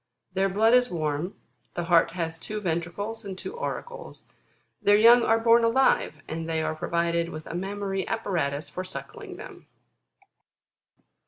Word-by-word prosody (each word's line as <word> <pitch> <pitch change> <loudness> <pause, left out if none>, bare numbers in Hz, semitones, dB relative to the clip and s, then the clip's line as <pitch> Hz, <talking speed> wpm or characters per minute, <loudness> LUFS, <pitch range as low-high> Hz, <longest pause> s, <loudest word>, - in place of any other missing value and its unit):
Their 195 +1 +1
blood 220 +4 +3
is 250 0 +5
warm; 155 +2 -2 0.4
the 175 - -2
heart 170 -1 +4
has 165 -2 -3
two 215 +5 -5
ventricles 200 +5 -3
and 195 -2 -6
two 455 - -7
auricles; 485 0 -6 0.6
their 205 0 +5
young 235 +3 +7
are 225 -1 +3
born 230 +1 +5
alive, 230 - +2
and 165 +1 -4
they 160 -1 0
are 155 - -1
provided 170 +1 -1
with 155 -2 -8
a - - -7
mammary 195 +1 -3
apparatus 165 -10 -2
for 185 - -5
suckling 185 - -8
them. - - -11
190 Hz, 150 wpm, -26 LUFS, 165-225 Hz, 0.6 s, young